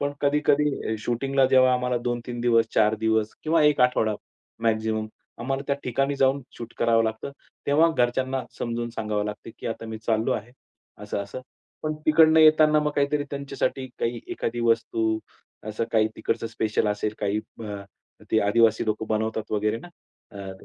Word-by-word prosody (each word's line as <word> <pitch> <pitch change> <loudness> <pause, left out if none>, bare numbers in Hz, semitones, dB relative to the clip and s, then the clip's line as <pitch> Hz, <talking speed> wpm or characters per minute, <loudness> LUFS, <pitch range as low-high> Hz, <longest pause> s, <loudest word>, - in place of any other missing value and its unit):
पण 145 0 -1
कधी-कधी 145 -4 +1
शूटिंगला 135 +3 +1
जेव्हा 130 -1 +5
आम्हाला 125 0 0
2-3 120 0 -3
दिवस, 115 -2 +3
4 105 +1 +4
दिवस, 110 0 0
किंवा 160 0 +3
1 150 -3 +3
आठवडा 120 -4 +3 0.5
मॅक्सिमम 110 -1 0 0.3
आम्हाला 135 +3 -2
त्या 140 - +1
ठिकाणी 135 +3 0
जाऊन 135 +1 +2
शूट 115 -1 -8
करावं 115 -1 +3
लागतं. 110 +4 -3 0.4
तेव्हा 155 +4 +4
घरच्यांना 130 +2 +1 0.2
समजून 120 0 -3
सांगावं 105 -2 -2
लागतं 105 +2 -6
की, - - -7
"आता 115 0 -4
मी 110 0 -6
चाललो 110 0 0
आहे. 110 +3 -4 0.5
असं-असं." 100 +3 -5 0.4
पण 155 0 -1
तिकडनं 160 0 +6
येताना 155 -1 +6
मग 150 0 0
काहीतरी 145 +1 +1
त्यांच्यासाठी, 140 -1 -3
काही 115 0 -1
एखादी 120 +1 -3
वस्तू 115 -1 +1 0.5
असं 110 +2 -2
काही 110 -1 +3
तिकडचं 115 0 -2
स्पेशल 110 -1 0
असेल, 105 +1 -2
काही 105 0 0 0.3
अ, 100 -1 -6 0.5
ते 110 - +3
आदिवासी 110 +2 +3
लोकं 110 0 -1
बनवतात 110 0 -2
वगैरे 105 +1 0
ना, 175 - -12 0.4
अ, 100 -1 -8
115 Hz, 155 wpm, -25 LUFS, 110-135 Hz, 0.5 s, तिकडनं